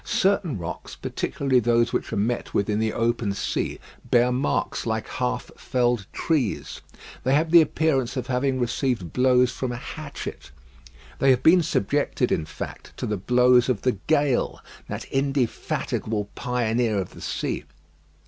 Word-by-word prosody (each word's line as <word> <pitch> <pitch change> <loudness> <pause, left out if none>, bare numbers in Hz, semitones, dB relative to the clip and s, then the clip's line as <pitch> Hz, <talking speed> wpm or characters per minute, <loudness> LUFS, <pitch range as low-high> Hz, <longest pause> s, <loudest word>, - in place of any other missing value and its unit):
Certain 190 - +1
rocks, 85 -2 -6
particularly 135 -3 0
those 120 0 +2
which - - -2
are 110 - -2
met 115 +4 -1
with 100 +1 +1
in 105 - 0
the 110 0 +1
open 115 -3 0
sea, - - -2 0.3
bear 120 +1 +4
marks 125 -1 -1
like 110 -1 -1
half 125 0 -2
felled 120 -5 0
trees. 140 -11 -1 0.4
They 130 +2 +3
have 160 +2 +1
the 170 -1 +9
appearance 140 -5 0
of 125 - -2
having 130 +1 0
received 120 - -1
blows 125 -1 +4
from 130 -2 -3
a - - -3
hatchet. 145 +3 -7 0.7
They 135 - +4
have 130 -2 +4
been 175 +2 +7
subjected, 140 -2 0
in 80 - +1
fact, - - -8
to - - -3
the 105 - -1
blows 125 +4 +4
of 120 -6 0
the 125 -6 +1
gale, 145 -5 +2 0.3
that - - -5
indefatigable 125 -5 -1
pioneer 120 -3 0
of 95 -2 -3
the - - -13
sea. - - -3
125 Hz, 155 wpm, -25 LUFS, 115-135 Hz, 0.7 s, the